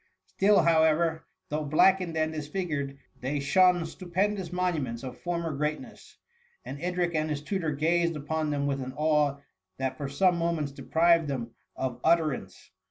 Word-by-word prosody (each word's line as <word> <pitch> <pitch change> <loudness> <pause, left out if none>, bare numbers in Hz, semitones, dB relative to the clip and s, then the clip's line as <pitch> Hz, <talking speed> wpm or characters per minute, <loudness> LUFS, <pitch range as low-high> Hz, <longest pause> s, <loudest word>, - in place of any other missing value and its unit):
Still, 200 +1 +3
however, 160 0 +2 0.2
though 150 +1 -2
black 155 +6 +4
ened 170 -3 -5
and 155 0 0
disfigured, 150 -3 -3 0.2
they 135 +3 -2
shone 180 +4 +4
stupendous 185 +2 -2
monuments 160 -10 -2
of 125 -1 -7
former 170 -3 -3
greatness; 150 +2 -5 0.5
and 140 +1 -7
Edric 175 -1 -1
and 155 0 0
his 145 -1 -3
tutor 175 -1 -2
gazed 170 +3 +1
upon 155 +1 -2
them 145 -1 -1
with 140 -1 -1
an 130 0 -6
awe 150 -2 +2 0.4
that 130 -1 -2
for 140 -2 -4
some 180 +5 +2
moments 165 -4 -1
deprived 165 +3 +2
them 125 -4 -4 0.2
of 125 -2 -3
ut 170 +1 +6
terance. 130 - -5
155 Hz, 160 wpm, -28 LUFS, 140-170 Hz, 0.5 s, ut